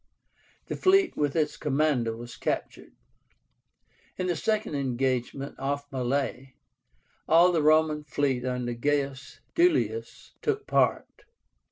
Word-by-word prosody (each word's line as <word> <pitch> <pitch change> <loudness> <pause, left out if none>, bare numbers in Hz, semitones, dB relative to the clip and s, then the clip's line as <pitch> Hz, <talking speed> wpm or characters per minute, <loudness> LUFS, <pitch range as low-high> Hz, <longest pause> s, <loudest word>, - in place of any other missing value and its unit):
The - - -4
fleet 380 -1 +3
with 145 -2 -1
its 155 -2 0
commander 140 -6 0
was 120 +1 -9
captured. - - -4 1.2
In 185 - -2
the 180 -1 0
second 215 +2 -1
engagement, 135 0 -2
off 140 +1 -2
Mylae, 130 0 -2 0.7
all 170 +3 +6
the 165 -3 +1
Roman 155 0 +3
fleet 140 -4 0
under 125 -1 -2
GAIUS 140 +1 -2
DUILIUS 355 +6 0
took 425 -1 -1
part. - - +2
145 Hz, 115 wpm, -27 LUFS, 130-160 Hz, 1.2 s, all